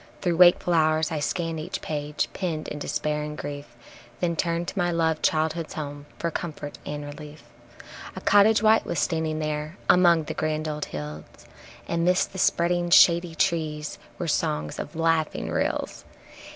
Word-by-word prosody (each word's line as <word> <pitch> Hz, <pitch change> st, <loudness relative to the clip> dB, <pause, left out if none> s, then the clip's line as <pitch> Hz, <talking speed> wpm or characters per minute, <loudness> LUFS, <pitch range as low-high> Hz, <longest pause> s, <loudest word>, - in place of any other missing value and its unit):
Through 175 Hz, -3 st, +1 dB
wakeful 175 Hz, 0 st, +6 dB
hours 155 Hz, -1 st, +2 dB
I 155 Hz, -, -1 dB
scan 165 Hz, +1 st, -2 dB
each 170 Hz, +5 st, -4 dB
page 150 Hz, -1 st, -2 dB
penned 165 Hz, -5 st, -3 dB
in 150 Hz, -, -6 dB
despair 150 Hz, +1 st, -2 dB
and 150 Hz, 0 st, -5 dB
grief, 145 Hz, -4 st, -7 dB, 0.4 s
Then 170 Hz, -2 st, 0 dB
turn 170 Hz, 0 st, -1 dB
to -, -, -6 dB
my 175 Hz, -3 st, +1 dB
loved 165 Hz, -2 st, 0 dB
childhood's 160 Hz, +1 st, 0 dB
home 145 Hz, -1 st, -6 dB
for 170 Hz, -, -2 dB
comfort 150 Hz, -3 st, -6 dB
and 145 Hz, 0 st, -4 dB
relief. 150 Hz, 0 st, -10 dB, 0.7 s
A 190 Hz, -, -6 dB
cottage 205 Hz, +2 st, +5 dB
white 220 Hz, +1 st, +5 dB
was -, -, -4 dB
standing 160 Hz, -1 st, 0 dB
there 155 Hz, +2 st, -3 dB
among 175 Hz, -3 st, +5 dB
the -, -, -5 dB
grand 155 Hz, 0 st, -2 dB
old 150 Hz, -1 st, -3 dB
hills. 75 Hz, 0 st, -7 dB, 0.6 s
And 170 Hz, 0 st, -1 dB
'midst 180 Hz, +1 st, +2 dB
the 190 Hz, -, -6 dB
spreading 175 Hz, 0 st, +2 dB
shady 170 Hz, 0 st, +5 dB
trees 155 Hz, -3 st, -1 dB, 0.2 s
were -, -, -3 dB
songs 75 Hz, 0 st, -1 dB
of 150 Hz, -, -6 dB
laughing 165 Hz, -1 st, 0 dB
rills. -, -, -2 dB
160 Hz, 165 wpm, -25 LUFS, 150-170 Hz, 0.7 s, wakeful